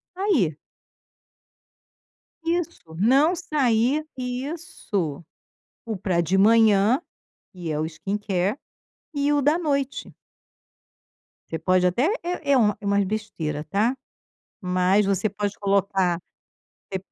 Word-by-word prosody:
Aí. 305 - +1 1.9
Isso, 335 - -2
"não 270 - +4
sair" 280 -3 +1
isso. 250 - -4 0.6
O 225 -2 -3
pra 185 -2 -1
de 170 +3 +1
manhã, 220 - +5 0.5
e 175 -3 -6
é 150 - -2
o 155 - 0
skincare, 195 +4 -2 0.6
e 285 +1 +1
o 290 - +3
da 295 +4 +3
noite. 280 -5 -2 1.4
Você 160 - -3
pode 185 +2 +2
até 235 - +2 0.2
é 340 -5 -2
é 270 - +5
uma 210 -4 +3
é - - -10
umas 200 0 +2
besteira, 185 -8 -3
tá. 215 - +1 0.7
Mas 185 +2 +2
você 200 +2 +1
pode 205 0 -3
colocar 195 -3 +1 0.7
você 190 - -2
205 Hz, 110 wpm, -24 LUFS, 185-275 Hz, 1.9 s, manhã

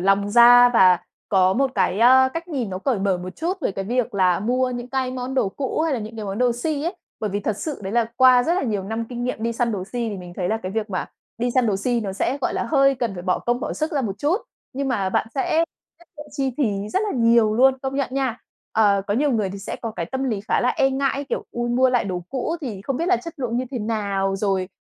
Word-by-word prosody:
lòng 195 +2 +2
ra 245 +2 +8
và 185 -7 +5 0.3
có 185 -2 +4
một 270 +5 +1
cái, 190 - +1
ơ, 260 +2 +6
cách 335 +1 -5
nhìn 255 - -3
nó 185 - -4
cởi 235 +1 0
mở 195 -2 0
một 185 +1 -8
chút 360 +3 -2
về 200 - -1
cái 195 - -4
việc 245 0 -1
là 185 -2 +2
mua 250 +4 +1
những 245 0 -5
cái 260 -1 -1
món 255 +1 -4
đồ 205 - +2
cũ 270 +8 -3
hay 320 -1 +1
là 250 - -1
những 220 +2 -8
cái 215 - -5
món 195 +1 -4
đồ 250 -1 +3
si 285 +5 -2
ấy. 350 +3 -3 0.2
Bởi 215 - -2
vì 205 +2 -2
thật 210 0 -2
sự 295 +8 -5
đấy 190 - -4
là 235 0 +3
qua 255 -1 +6
rất 335 +7 +1
là 375 - 0
nhiều 210 -6 -1
năm 225 +3 -3
kinh 245 -1 -4
nghiệm 250 -3 -3
đi 230 +1 0
săn 235 0 0
đồ 185 -2 -3
si 235 +2 -3
thì 205 - -4
mình 180 -1 -9
thấy 180 -1 -1
là 220 - +1
cái 185 +1 -4
việc 220 -1 -3
mà 185 - -2 0.3
đi 245 +1 0
săn 255 -2 +3
đồ 205 -3 +1
si 240 +4 0
nó 195 -3 -4
sẽ, 250 +7 -1
gọi - - -1
là, - - -1
hơi 275 -2 +3
cần 240 -5 -2
phải 175 - -7
bỏ 180 -1 0
công 240 +1 -1
bỏ - - -3
sức 310 +1 -2
ra 290 - +1
một 200 -4 -4
chút. 305 - +1 0.4
Nhưng 275 +1 -2
mà 200 -7 0
bạn 190 - 0
sẽ 315 +4 +1 0.3
tiết 345 - -20
kiệm 295 0 -9
chi 270 -3 -1
phí 210 -7 -1
rất 380 - 0
là 425 - -1
nhiều 230 -2 +4
luôn, 265 +3 +4
công 265 0 -3
nhận 275 -1 0
nha. 265 -3 -1 0.3
Ờ, 205 -3 +3
có 205 - 0
nhiều 285 +5 +2
người 210 -4 0
thì 200 - -7
sẽ 195 - -6
có 230 - -3
cái 170 - -3
tâm 265 +8 -3
lý 220 -6 -1
khá - - +2
là 250 - +2
e 270 -1 +2
ngại, 275 +1 -1
kiểu: - - -2
"Ôi, 240 0 -2
mua 255 +2 +3
lại 245 -2 +2
đồ 180 -3 -3
cũ 270 +5 -2
thì 215 -9 -6
không 270 +2 -2
biết 335 - -1
là 370 - +4
chất 335 -2 -8
lượng 245 -4 -2
như 255 - 0
thế 255 - -3
nào, 200 -3 -1
rồi, 190 -2 -1
240 Hz, 290 wpm, -22 LUFS, 200-265 Hz, 0.4 s, ra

